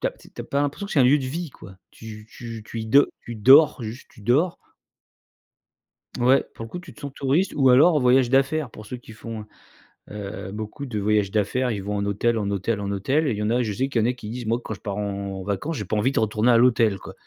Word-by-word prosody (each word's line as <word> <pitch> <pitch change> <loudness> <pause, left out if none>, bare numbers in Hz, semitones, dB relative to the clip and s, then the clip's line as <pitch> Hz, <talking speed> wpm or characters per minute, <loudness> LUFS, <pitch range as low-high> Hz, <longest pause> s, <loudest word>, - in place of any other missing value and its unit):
tu - - 0
as - - -6
tu - - -19
as - - -4
pas 140 - -1
l'impression 145 +8 -3
que - - -7
c'est - - +2
un - - +6
lieu 140 +4 +5
de 135 - -4
vie, 165 +4 -4
quoi. 95 -5 -13
Tu 110 -1 -11
tu 115 -2 -8
tu 115 - -5
y 110 - -5
do 140 +6 +5
tu 120 - -8
dors, 135 +8 +6
juste 115 +4 -7
tu 115 - -17
dors. 145 - +2 1.6
Ouais, 130 +3 +4
pour 115 - -7
le - - -12
coup, 175 - -6
tu 175 -3 -13
te - - -18
sens 140 -2 -7
touriste 145 +8 +1
ou 135 -2 +4
alors 145 +8 +6
en - - +3
voyage 125 0 +4
d'affaires 135 +2 +1
pour 110 -1 -12
ceux 125 - -6
qui 115 -2 -14
font, 110 0 -8 0.6
heu 105 -1 -7
heu, - - -7
beaucoup 110 +7 -6
de 115 -4 -4
voyages 105 -1 +1
d'affaires, 110 +5 0
ils 100 -4 -3
vont 105 +1 -3
en 100 - -1
hôtel, 110 +3 0
en 100 -1 -2
hôtel, 100 +2 -1
en 100 - -3
hôtel 135 +11 0
et - - +1
il - - -5
y 105 - -2
en 105 - 0
a 120 +1 +2
je 110 -3 -2
sais 130 +7 -1
qu'il 125 -4 0
y - - +1
en - - +2
a - - 0
qui 115 -4 -9
disent: 120 +1 -6
«Moi, 115 +2 +1
quand - - -5
je 100 - -10
pars 100 -1 -4
en 100 -2 -4
en - - -7
vacances, 100 - -3
j'ai 105 - -4
pas 110 - -2
envie 105 +6 +2
de - - 0
retourner 110 +2 +1
à 115 - +6
l'hôtel, 115 -4 +3
quoi. - - -11
115 Hz, 285 wpm, -24 LUFS, 105-135 Hz, 1.6 s, un